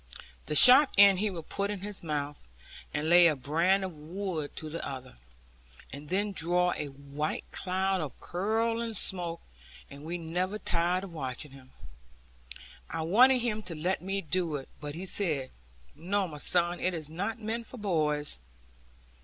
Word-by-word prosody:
The 150 - -2
sharp 260 - +9
end 200 -2 +7
he 215 +1 +1
would 170 -5 -7
put 200 0 -2
in 205 -3 -4
his 205 0 -4
mouth, 145 -2 -3 0.5
and 150 +1 -2
lay 175 +1 +7
a 155 - +2
brand 165 +9 +1
of 185 - -6
wood 160 0 -5
to 155 - -6
the 160 +2 -5
other, 130 - -7 0.8
and 145 +1 -9
then 200 +3 0
draw 180 0 +1
a 150 - -4
white 140 +2 -4
cloud 190 0 -1
of 145 -5 -6
curling 225 +4 -1
smoke, 175 -3 +1 0.5
and 140 +1 -11
we 170 +3 -4
never 180 +4 -2
tired 180 -1 0
of 190 -3 -8
watching 135 -1 -5
him. 130 -1 -15 1.2
I 160 +1 -2
wanted 245 +9 +5
him 220 -3 -1
to 175 -5 -6
let 175 +5 -1
me 195 +2 -2
do 170 -1 -1
it, 135 -2 -6
but 145 0 -6
he 180 +3 -6
said, 155 -9 0 0.4
'No, 190 +4 -1
my 150 -3 -9
son; 175 +3 +2
it 185 -1 0
is 155 -3 -4
not 200 +9 -4
meant 225 +1 -4
for 255 - -10
boys.' 150 - -1
175 Hz, 170 wpm, -29 LUFS, 150-195 Hz, 1.2 s, sharp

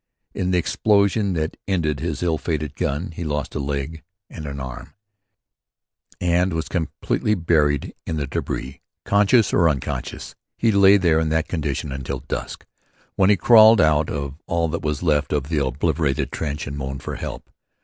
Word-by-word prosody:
In 90 - -2
the 90 - +2
explosion 100 +2 +2
that 80 -1 -2
ended 80 -7 0
his 85 0 -3
ill 80 -3 0
fated 75 -3 -3
gun, 80 +1 -2
he 85 +2 -6
lost 75 -3 -3
a - - -3
leg 70 +3 -3 0.3
and 80 -3 -7
an 70 0 -5
arm, 65 -2 -8 1.2
and 90 +1 +1
was 80 -2 -2
completely 90 +5 -1
buried 75 -5 +1
in 80 - -2
the 75 - -1
débris. 65 0 -4 0.3
Conscious 105 +2 +3
or 85 -1 +4
unconscious, 70 -4 -4 0.2
he 115 - +2
lay 100 0 +6
there 85 -4 +3
in 80 -1 0
that 80 +1 0
condition 75 -3 -3
until 65 -1 -4
dusk, 70 - -5 0.5
when 95 0 +3
he 105 - +5
crawled 110 +2 +7
out 75 -3 +3
of 70 +1 -5
all 85 -1 +1
that 85 - -3
was 75 +1 -2
left 75 -3 +1
of 75 -1 -1
the 80 -3 +1
obliterated 65 +2 -1
trench 75 -1 -3
and 70 +1 -6
moaned 65 0 -5
for - - -5
help. - - -7
80 Hz, 170 wpm, -22 LUFS, 70-90 Hz, 1.2 s, crawled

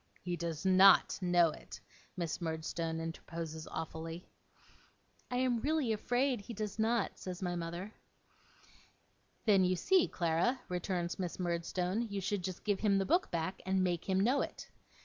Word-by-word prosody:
'He 175 0 -2
does 170 0 -4
NOT 190 +1 +6
know 175 -2 +4
it,' - - -10 0.4
Miss 170 0 -3
Murdstone 160 0 -2
interposes 165 -1 -6
awfully. 165 +1 -6 1.0
'I 245 - -1
am 250 -2 +2
really 295 -6 +1
afraid 245 +2 0
he 230 +3 -8
does 210 0 -4
not,' 225 -1 +1
says 185 0 -6
my 175 -1 -1
mother. 175 +5 -5 1.5
'Then, 200 -4 +5
you 185 0 +2
see, 365 - +3
Clara,' 170 +9 +1
returns 180 -1 -2
Miss 180 -2 -3
Murdstone, 180 +3 -1
'you 200 -1 -2
should 195 0 -2
just 185 -1 -5
give 205 -2 0
him 200 -2 +3
the 195 - +1
book 345 - +2
back, 170 +2 -3
and 190 0 +1
make 175 0 -1
him 190 0 +3
know 250 +8 +3
it. - - -6
185 Hz, 155 wpm, -34 LUFS, 170-210 Hz, 1.5 s, NOT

